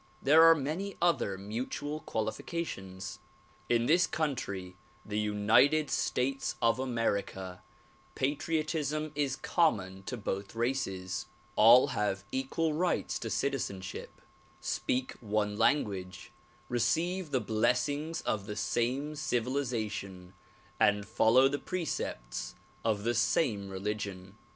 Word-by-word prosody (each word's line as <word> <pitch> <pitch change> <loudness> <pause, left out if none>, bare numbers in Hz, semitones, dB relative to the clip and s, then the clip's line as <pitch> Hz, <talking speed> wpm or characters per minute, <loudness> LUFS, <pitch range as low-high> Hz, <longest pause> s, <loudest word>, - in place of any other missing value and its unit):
There 155 +4 +6
are 165 0 +9
many 160 +8 -3
other 165 - +1
mutual 125 +9 -4
qualifications. 105 - -4 0.5
In 120 -1 +3
this 170 +7 +4
country, 100 - -3 0.3
the 105 0 -2
United 105 +9 +3
States 135 +2 0
of 115 +1 +2
America, 100 -7 -2 0.5
patriotism 155 +1 -1
is 140 -2 0
connnon 100 - +1
to 125 - -3
both 100 -1 -4
races; 100 -7 -2 0.3
all 115 +4 +7
have 100 -2 -1
equal 145 +5 0
rights 175 +4 0
to - - -4
citizenship, 100 -10 -3 0.4
speak 130 +1 -1
one 105 -2 0
language, 95 -9 0 0.4
receive 170 +8 0
the 130 - +1
blessings 125 +8 0
of 100 -2 -2
the 105 - -4
same 120 +7 -1
civilization 115 -9 -2 0.5
and 105 -1 +3
follow 125 +6 +5
the 145 +1 -2
precepts - - -4 0.3
of 105 -3 0
the 120 +2 +1
same 105 -8 +1
religion. 100 -1 -4
120 Hz, 105 wpm, -31 LUFS, 100-145 Hz, 0.5 s, are